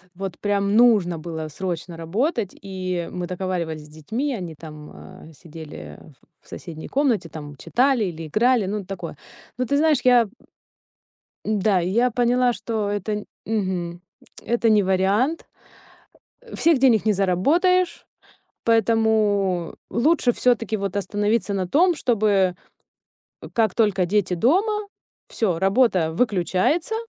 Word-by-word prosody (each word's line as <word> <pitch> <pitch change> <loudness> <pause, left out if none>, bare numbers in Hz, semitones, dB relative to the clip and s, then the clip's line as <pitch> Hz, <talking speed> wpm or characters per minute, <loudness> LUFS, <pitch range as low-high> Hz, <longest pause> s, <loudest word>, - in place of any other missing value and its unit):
вот 190 -1 -6
прям 200 0 0
нужно 205 -9 +4
было 160 -1 -6
срочно 170 +1 -5
работать, 205 - -2
и 185 -3 -4
мы 180 -1 -4
договаривались 175 -4 -4
с - - -17
детьми, 220 - -3
они 175 -8 -6
там, 150 -1 -11
а, 160 - -13
сидели 160 -1 -11 0.4
в - - -28
соседней 160 -2 -9
комнате, 260 -10 0
там 145 -2 -9
читали 250 - +1
или 165 -3 -6
играли, 235 - +2
ну, 200 +1 -3
такое. 195 +1 -7 0.4
Ну, 255 - -1
ты 280 - 0
знаешь, 305 0 +3
я 245 -3 +5 1.2
Да, 205 -3 +1
и 175 - -2
я 240 +5 +2
поняла, 245 +1 +2
что 220 -3 -3
это, 205 +1 -3 0.2
мгм, 185 -5 -2 0.4
это 235 -1 +1
не 210 -2 +4
вариант, 195 - +1 1.1
всех 330 -3 +3
денег 245 -6 +4
не 215 - +3
заработаешь, 310 - +1 0.6
поэтому 215 -5 +2 0.2
лучше 260 0 +2
всё-таки, 230 -2 +1
вот, 200 -1 -4
остановиться 205 +2 0
на 190 -2 -1
том, 345 - +3
чтобы 205 - +1 1.0
как 220 -5 +2
только 205 -5 +2
дети 185 -1 +1
дома, 400 - +1 0.4
всё, 185 -7 -1
работа 195 -4 +2
выключается. 205 - 0
205 Hz, 125 wpm, -23 LUFS, 180-240 Hz, 1.2 s, я